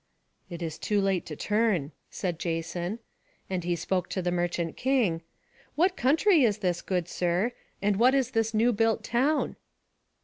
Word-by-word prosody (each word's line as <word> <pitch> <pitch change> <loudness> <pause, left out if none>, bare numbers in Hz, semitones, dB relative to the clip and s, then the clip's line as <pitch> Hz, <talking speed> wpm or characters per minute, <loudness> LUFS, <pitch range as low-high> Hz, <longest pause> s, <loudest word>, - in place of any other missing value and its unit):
"It 170 -1 -6
is 160 -1 -5
too 210 -1 +1
late 195 -3 0
to 150 - -6
turn," 205 -7 +1 0.2
said 175 -4 -3
Jason. 175 +4 -3 0.5
And 180 -2 -1
he 175 0 0
spoke 180 +2 -1
to 190 - -2
the 175 - 0
merchant 175 -1 -1
king: 245 -11 +1 0.5
"What 360 +4 +3
country 315 - +4
is 215 -4 +3
this, 180 -4 -1
good 180 -3 -1
sir; 180 +7 0 0.3
and 205 -1 +2
what 250 +5 +5
is 260 -2 +1
this 225 -1 +1
new 230 +2 +3
built 225 +1 +1
town?" 270 +6 +1
195 Hz, 165 wpm, -28 LUFS, 175-235 Hz, 0.5 s, what